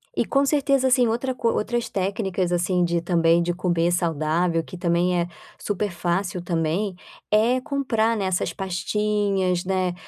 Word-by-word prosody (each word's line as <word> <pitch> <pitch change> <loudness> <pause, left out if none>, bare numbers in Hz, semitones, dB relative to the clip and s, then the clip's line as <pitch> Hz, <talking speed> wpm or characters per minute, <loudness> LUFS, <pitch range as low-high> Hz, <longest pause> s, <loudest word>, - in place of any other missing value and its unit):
E - - +1
com 275 0 +2
certeza, 275 -2 +2
assim, 250 -2 +4
outra 250 +3 -1
co 230 - 0
outras 235 +2 -1
técnicas, 190 -2 -1
assim, 180 +1 +1
de 170 0 0
também 170 -1 +3
de 175 - -1
comer 175 -1 0
saudável 165 0 0
que 180 - -10
também 175 +1 +1
é 170 - 0 0.3
super 205 0 -2
fácil 175 +2 -2
também, 175 +3 -1 0.4
é 230 +4 +3
comprar, 250 -6 0
né, 200 - -1
essas 185 -1 0
pastinhas, 195 -1 -1
né, 185 -1 0
185 Hz, 155 wpm, -23 LUFS, 175-215 Hz, 0.4 s, assim